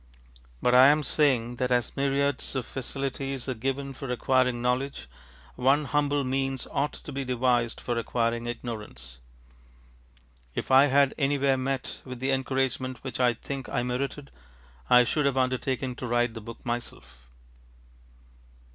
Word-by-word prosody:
But 125 - +3
I 130 +2 +9
am 150 +1 +4
saying 125 -5 +2
that 125 0 -1
as 120 -3 +1
myriads 140 0 0
of 130 -3 -1
facilities 135 0 -4
are 130 - 0
given 135 +3 -3
for 135 0 -7
acquiring 125 0 +2
knowledge, 125 - -1 0.5
one 135 +4 +2
humble 145 0 +1
means 135 0 -1
ought 145 +1 0
to - - -9
be 135 0 -3
devised 125 -2 +1
for 120 - -2
acquiring 115 0 -1
ignorance. 105 - -7 1.4
If - - -3
I 135 +2 +7
had 140 0 +4
anywhere 140 -1 +2
met 130 0 -3
with 130 -2 -8
the 135 +2 0
encouragement 130 -1 -1
which 130 -2 -5
I 125 -2 +3
think 135 +2 -6
I 125 - -1
merited, 135 +3 -3 0.6
I 125 0 +8
should 145 +4 +1
have 135 -1 0
undertaken 130 0 0
to 125 - -5
write 120 0 +1
the 115 - -7
book 115 +2 -10
myself. 120 - -6
130 Hz, 145 wpm, -27 LUFS, 120-135 Hz, 1.4 s, I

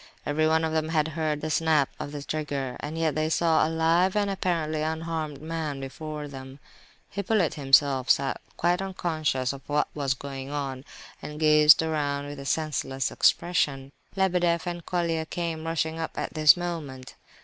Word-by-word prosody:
Every 155 +2 +1
one 160 +1 +2
of 160 - -2
them 160 0 0
had 160 -1 +1
heard 155 -1 -2
the 155 - -3
snap 155 -3 +3
of 145 - -5
the 145 -1 -6
trigger, 140 -4 -3
and 150 +2 -5
yet 160 -2 +1
they 155 0 0
saw 160 -1 +3
a - - -2
live 165 +4 +2
and 205 -1 +1
apparently 165 -5 -1
unharmed 160 -2 -3
man 160 -3 -3
before 150 +2 -6
them. 135 -1 -10 0.5
Hippolyte 200 -3 +1
himself 135 -2 +3
sat 135 -1 +2 0.2
quite 175 +2 +1
unconscious 155 -8 -1
of 135 - -9
what 150 0 +1
was 140 -3 -1
going 135 0 -7
on, 140 -2 -4 0.4
and 150 0 -7
gazed 150 0 +6
around 145 -3 -1
with 145 0 -7
a 140 - -8
senseless 140 -4 -1
expression. 140 -6 +1 0.2
Lebedeff 175 -3 +1
and 175 -1 -4
Colia 170 -2 -1
came 165 -2 -4
rushing 165 0 -1
up 160 - -5
at - - -3
this 155 +1 +6
moment. 155 -7 -5
155 Hz, 170 wpm, -26 LUFS, 145-165 Hz, 0.5 s, gazed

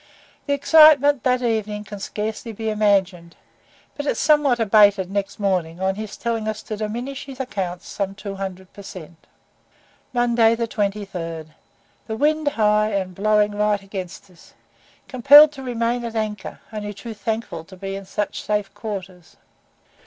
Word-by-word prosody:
The 285 - +1
excitement 290 -1 +6
that 255 -1 +2
evening 215 -3 -1
can 205 -1 -9
scarcely 215 +3 -4
be 220 +1 -3
imagined, 195 -5 +1 0.6
but 290 0 -5
it - - 0
somewhat 295 -5 +3
abated 205 -3 +4
next 200 0 -3
morning 180 -4 -1
on 190 0 0
his 210 +1 -7
telling 230 -2 -2
us 215 0 -4
to 215 - -5
diminish 235 +6 -5
his 270 -1 -10
accounts 190 -9 -4
some 195 -1 -4
200 195 -2 -7
per 200 - -11
cent. 170 -4 -11 0.8
MONDAY, 235 -2 +3
23. 200 -7 -3 0.6
The 220 -1 -4
wind 305 +2 +1
high, 215 -4 +2
and 190 -2 -2
blowing 210 +2 +2
right 205 -1 0
against 195 0 -8
us. 170 - -20 0.5
Compelled 285 +4 +8
to 280 -3 -10
remain 240 -1 -1
at 230 -1 -5
anchor, 215 -2 -4
only 210 -1 -5
too 230 +2 -8
thankful 220 -6 -4
to 190 +2 -14
be 195 +1 -5
in 195 0 -7
such 205 +2 -3
safe 210 -2 -2
quarters. 190 -5 -8
210 Hz, 150 wpm, -22 LUFS, 195-235 Hz, 0.8 s, Compelled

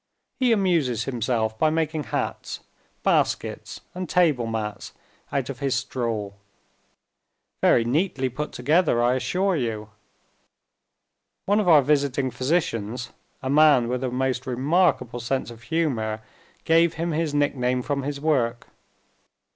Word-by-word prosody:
He 255 -2 +3
amuses 170 - +2
himself 115 -3 -1
by 155 - +4
making 155 -1 -1
hats, - - -4 0.4
baskets, - - 0
and 185 -2 -5
table 150 -10 +2
mats, 110 -2 -4 0.4
out 135 -3 -1
of 135 -2 -6
his 135 -2 0
straw. 115 -5 -2 1.3
Very 115 - +4
neatly 140 +1 0
put 140 +5 -4
together, 155 -5 +2
I 120 +1 +3
assure 185 +8 0
you. 110 -6 -3 1.6
One 205 +2 +3
of 210 - 0
our 155 -5 +7
visiting 140 -2 +1
physicians, 125 -4 -1 0.3
a 130 - -2
man 145 -5 +5
with 125 +1 -2
a 130 - 0
most 130 +1 -2
remarkable 130 -1 +1
sense 120 +1 -2
of 115 -1 -13
humor, 120 -10 -1 0.4
gave 165 0 +4
him 165 +2 -2
his 155 -1 -1
nickname 125 -3 +1
from 140 0 -1
his 140 +1 -4
work. 125 -6 0
135 Hz, 130 wpm, -24 LUFS, 120-160 Hz, 1.6 s, our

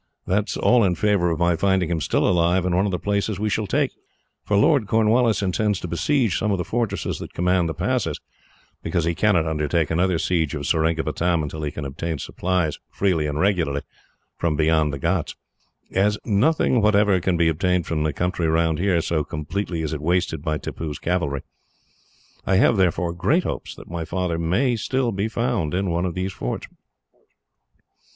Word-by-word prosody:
That 105 +3 0
is - - -3
all 125 -2 +4
in 90 -3 +2
favour 100 -2 +2
of 80 - -1
my 85 +1 +2
finding 95 -1 +1
him, 80 -2 -1
still - - +1
alive, 90 +1 +2
in 90 -1 +1
one 95 +3 +2
of - - -1
the 90 - -1
places 100 +1 -1
we 105 0 -1
shall 105 +1 -1
take, - - +1 0.5
for 105 - +1
Lord 110 +1 +3
Cornwallis 110 +1 +2
intends 100 +1 0
to - - -5
besiege 110 - +1
some 105 - 0
of 100 - +1
the 90 - -2
fortresses 110 -4 -2
that - - -9
command 90 -1 +1
the 80 - -4
passes, 120 - -1 0.6
because 85 0 -1
he 85 - +1
cannot 90 -3 +2
undertake 80 0 0
another 90 +2 +2
siege 80 -3 0
of - - -4
Seringapatam 80 +1 +1
until 75 +1 -5
he 75 - -2
can 75 0 -6
obtain 80 +4 -4
supplies, 90 +1 -2
freely 90 -6 0
and 75 0 -3
regularly, 85 -8 +1 0.6
from 85 -2 0
beyond 80 -1 +2
the 70 - -4
ghauts; 85 +4 -1 0.6
as 105 +2 +2
nothing 120 +3 +2
whatever 105 -2 +4
can 90 -1 +1
be 85 -1 +3
obtained 90 +2 +1
from 80 -2 -2
the 75 0 +1
country 90 +2 -1
round, 80 0 +1 0.2
so 80 -2 0
completely 80 +3 -4
is 80 - -2
it 75 - -4
wasted 85 -2 0
by 80 0 -1
Tippoo's 75 -1 -5
cavalry. 85 -6 -1 1.0
I 95 - +1
have, 110 +3 +4
therefore, 90 -3 +1
great 100 - +1
hopes - - -5
that - - -13
my 85 -1 -4
father 85 0 -2
may 115 +10 +1 0.4
be 100 +2 -1
found 110 -8 -1
in 95 -1 0
one 85 +2 0
of 85 - -5
these 95 +1 -2
forts." - - -4
90 Hz, 185 wpm, -23 LUFS, 80-100 Hz, 1.0 s, all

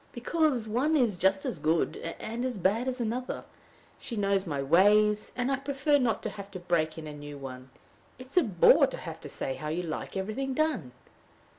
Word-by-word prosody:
"Because 255 -2 0
one 260 +9 +1
is 235 -8 +2
just 190 +2 +2
as 160 - -3
good 160 +2 +1 0.2
and 230 +3 -4
as 255 -3 -2
bad 205 +7 +1
as 255 0 -2
another. 240 +2 -3 0.6
She 240 - -6
knows 200 -2 +1
my 145 -3 -2
ways, 205 +8 +4
and 250 +2 0
I 270 - +2
prefer 280 +2 +1
not 240 -4 0
having 200 0 -6
to 185 - -5
break 170 -3 0
in 160 - -7
a 150 - -7
new 145 0 -8
one. 130 -1 -8 0.5
It 255 - -10
is 275 - -10
a 360 - +7
bore 190 -8 +5
to - - -6
have - - -8
to - - -8
say 135 - -3
how 155 - -6
you 165 +4 -2
like 165 +3 -5
everything 255 +8 -2
done." 310 - 0
210 Hz, 200 wpm, -29 LUFS, 170-255 Hz, 0.6 s, a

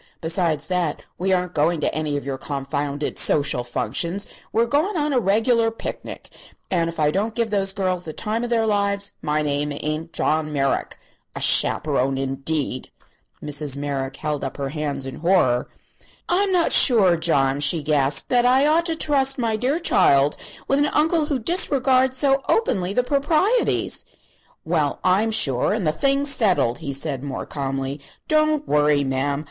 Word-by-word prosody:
Besides 160 -3 0
that, 180 -5 -2
we 190 +2 0
aren't 180 -1 0
going 155 +3 +1
to - - 0
any 155 -2 -2
of 140 - -6
your 135 -1 -4
confounded 145 +1 -3
social 140 -4 +2
functions; 165 - -2 0.3
we're 230 +1 +2
going 305 - 0
on 295 -1 0
a 255 - +3
reg'lar 225 +3 +2
picnic, 225 - -8 0.4
and 170 -3 +1
if 165 - -8
I 150 -1 +2
don't 215 +6 -2
give 230 -2 -1
those 195 -2 +2
girls 185 -2 -2
the 160 - -5
time 220 +7 -3
of 240 - -3
their 230 -2 +1
lives 200 -1 0
my 150 0 -1
name 145 0 -1
ain't 155 +3 -4
John 155 0 -1
Merrick. 135 -2 -1 0.4
A - - -4
chaperone, 135 -3 +3
indeed!" 135 0 -3 0.5
Mrs. 145 -2 -1
Merrick 140 -2 -4
held 150 -1 -4
up 135 - -5
her 140 -1 -3
hands 145 -2 -4
in 135 - -7
horror. 165 -9 +1 0.6
"I'm 390 +2 +1
not 350 -3 +2
sure, 205 -9 +6
John," 140 -5 +1
she 145 +2 0
gasped, 145 -2 0
"that 245 -1 +3
I 260 +3 +4
ought 325 +3 +2
to 330 - -1
trust 275 -4 +1
my 230 -3 0
dear 255 +7 0
child 140 - +3 0.3
with 275 - +1
an 290 - +2
uncle 310 +1 +1
who 285 - 0
disregards 260 -3 +2
so 275 0 +2
openly 190 - +1
the 250 - +2
proprieties." 310 - +1 0.6
"Well, 155 -4 0
I'm 195 +5 +2
sure; 140 - +1
and 215 -4 -2
the 155 - +2
thing's 275 - +1
settled," 185 - +1
he 140 - -5
said, 135 -1 -2
more 140 -2 -5
calmly. 135 0 -4 0.3
"Don't 310 -1 +1
worry, 150 -1 +2
ma'am. 135 +1 -1
170 Hz, 170 wpm, -22 LUFS, -, 0.6 s, sure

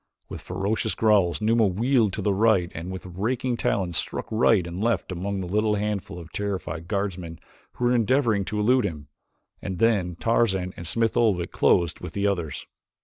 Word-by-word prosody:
With - - -7
ferocious 100 +5 -2
growls 105 -5 +3
Numa 110 0 +3
wheeled 115 +3 +2
to 105 - -3
the 100 - +2
right, 100 -4 +2
and 85 +3 -6
with 95 0 -7
raking 115 +8 -2
talons 90 -7 0
struck - - -3
right 110 -4 +3
and 85 +4 -5
left 115 -6 0
among 95 +2 -3
a - - -4
little 105 +3 +1
handful 105 -3 -3
of 85 -1 -10
terrified 90 -5 -4
guardsmen 95 -4 -3 0.4
who 125 - -2
were 120 - +3
endeavoring 115 -3 +2
to 105 - -3
elude 125 +4 +3
him, 75 -7 -5 0.5
and 95 - -4
then 100 -6 +2
Tarzan 95 -3 +1
and 85 - -7
Smith 115 +5 +1
Oldwick 100 -7 +1
closed 85 -2 +2
with - - -8
the 100 0 -1
others. 85 -7 -2
100 Hz, 180 wpm, -25 LUFS, 90-110 Hz, 0.5 s, growls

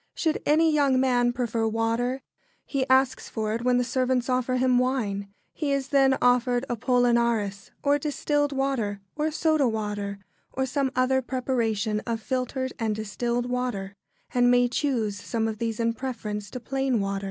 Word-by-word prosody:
Should 315 -2 0
any 315 +1 +4
young 280 -3 +3
man 245 -2 +3
prefer 235 -2 -1
water, 230 +4 -1 0.4
he 275 -2 -2
asks 260 0 +2
for 215 -1 -2
it 230 - -2
when 250 0 +3
the 250 - +2
servants 255 0 0
offer 255 0 +1
him 255 -1 +3
wine. 210 -6 -1 0.2
He 295 -3 -2
is 275 -1 -1
then 270 -1 +4
offered 245 0 +3
Apollinaris 235 -4 +1
or 285 0 +3
distilled 290 0 0
water 265 -7 -1 0.2
or 305 +1 0
soda 310 -3 +2
water, 205 -2 -3 0.4
or 265 - 0
some 270 +1 0
other 260 +1 +2
preparation 230 -5 -1
of 230 -1 -1
filtered 260 +2 -2
and 220 -2 0
distilled 235 +3 -2
water, 245 -6 -3 0.4
and 245 0 +4
may 245 0 +5
choose 235 -7 -1
some 225 -1 -1
of 220 -1 -4
these 230 -1 -2
in 230 0 +1
preference 215 -5 -5
to 250 - -6
plain 265 -1 0
water. 195 0 -1
245 Hz, 165 wpm, -26 LUFS, 225-265 Hz, 0.4 s, may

